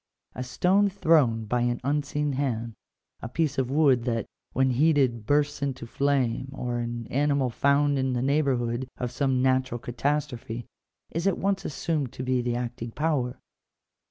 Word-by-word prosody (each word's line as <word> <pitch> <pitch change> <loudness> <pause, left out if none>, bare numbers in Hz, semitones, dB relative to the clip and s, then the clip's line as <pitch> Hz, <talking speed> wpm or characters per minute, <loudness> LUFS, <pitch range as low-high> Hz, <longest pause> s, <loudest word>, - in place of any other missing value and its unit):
A - - -6
stone 185 +10 +2
thrown 150 - +3
by 120 +3 0
an 120 0 0
unseen 145 +1 0
hand, 120 -4 -2 0.5
a 110 - -5
piece 145 0 0
of 130 -2 0
wood 135 -4 +4
that, 115 -3 -1 0.3
when 130 0 +2
heated, 130 -5 +2
bursts 145 0 +1
into 135 -3 -3
flame, 135 -1 0
or 120 -3 -3
an 120 0 -4
animal 140 -2 +1
found 140 +2 +2
in 130 -1 0
the 125 0 0
neighbour 140 0 +2
hood 120 +1 -2
of 125 -1 -3
some 130 0 +1
natural 130 -2 +2
catastrophe, 120 -2 -3 0.5
is 165 +4 -1
at 195 - +2
once 195 0 -1
assumed 145 -2 -2
to 130 - -5
be 130 -1 +1
the 120 0 -1
acting 120 -1 -4
power. 135 -2 -1
130 Hz, 160 wpm, -27 LUFS, 120-145 Hz, 0.5 s, wood